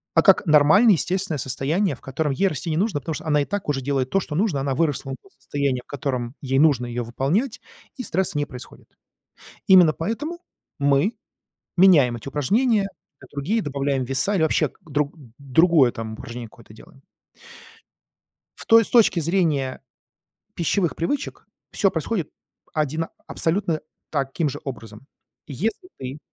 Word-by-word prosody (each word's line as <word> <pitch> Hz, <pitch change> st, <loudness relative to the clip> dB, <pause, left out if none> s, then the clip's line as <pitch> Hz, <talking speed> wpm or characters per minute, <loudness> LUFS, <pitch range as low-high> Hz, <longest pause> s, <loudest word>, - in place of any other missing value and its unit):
а -, -, +6 dB
как -, -, +5 dB
нормальное 160 Hz, +8 st, +6 dB
естественное 180 Hz, -2 st, -1 dB
состояние, 140 Hz, +7 st, -1 dB
в -, -, -22 dB
котором 145 Hz, +2 st, -2 dB
ей 195 Hz, +9 st, +1 dB
расти 155 Hz, -3 st, -3 dB
не 155 Hz, -, 0 dB
нужно, 190 Hz, -5 st, 0 dB
потому 160 Hz, +3 st, -4 dB
что -, -, -8 dB
она 150 Hz, -2 st, +2 dB
и -, -, -1 dB
так 205 Hz, 0 st, -4 dB
уже 135 Hz, -2 st, 0 dB
делает 135 Hz, -1 st, -1 dB
то, 195 Hz, -, +3 dB
что 155 Hz, -5 st, -5 dB
нужно. 175 Hz, -7 st, +1 dB
Она 135 Hz, -1 st, -1 dB
выросла 145 Hz, -3 st, -1 dB
до 195 Hz, -, -22 dB
состояния, 140 Hz, -3 st, -1 dB
в -, -, -54 dB
котором 130 Hz, -3 st, -3 dB
ей 135 Hz, -1 st, 0 dB
нужно 140 Hz, -5 st, +4 dB
её 120 Hz, 0 st, -3 dB
выполнять, 155 Hz, -, -1 dB, 0.4 s
и 255 Hz, -, -4 dB
стресс 190 Hz, -4 st, -1 dB
не 145 Hz, 0 st, 0 dB
происходит. 125 Hz, -2 st, -12 dB, 0.8 s
Именно 180 Hz, -5 st, +7 dB
поэтому 295 Hz, -, -4 dB, 0.4 s
мы 140 Hz, -, +2 dB, 0.6 s
меняем 150 Hz, -10 st, +6 dB
эти 115 Hz, -, -11 dB
упражнения 210 Hz, -, +2 dB, 0.4 s
на 130 Hz, -, -13 dB
другие, 170 Hz, +11 st, -1 dB
добавляем 140 Hz, -3 st, -1 dB
веса 135 Hz, +11 st, 0 dB
или 160 Hz, -, +2 dB
вообще 160 Hz, -, +2 dB
к -, -, -29 dB
друг 150 Hz, -1 st, -2 dB, 0.2 s
другое, 140 Hz, -1 st, +4 dB
там, 110 Hz, -1 st, -6 dB
упражнение 115 Hz, +1 st, -8 dB
какое-то 115 Hz, -1 st, -17 dB
делаем. 135 Hz, +5 st, -17 dB, 1.6 s
В -, -, -11 dB
то 225 Hz, -, +7 dB
есть 225 Hz, -, 0 dB
с -, -, -14 dB
точки 225 Hz, -7 st, +5 dB
зрения 155 Hz, -7 st, 0 dB, 0.7 s
пищевых 175 Hz, +1 st, 0 dB
привычек 220 Hz, -, -3 dB, 0.2 s
всё 195 Hz, -3 st, +2 dB
происходит 170 Hz, +1 st, -2 dB, 0.4 s
одина 155 Hz, +2 st, -1 dB, 0.2 s
абсолютно 165 Hz, -2 st, -1 dB, 0.3 s
таким 145 Hz, +2 st, -1 dB
же 135 Hz, -, -6 dB
образом. 115 Hz, -3 st, -8 dB, 0.4 s
Если 215 Hz, -, -3 dB
ты 130 Hz, +3 st, -6 dB
150 Hz, 160 wpm, -23 LUFS, 135-185 Hz, 1.6 s, Именно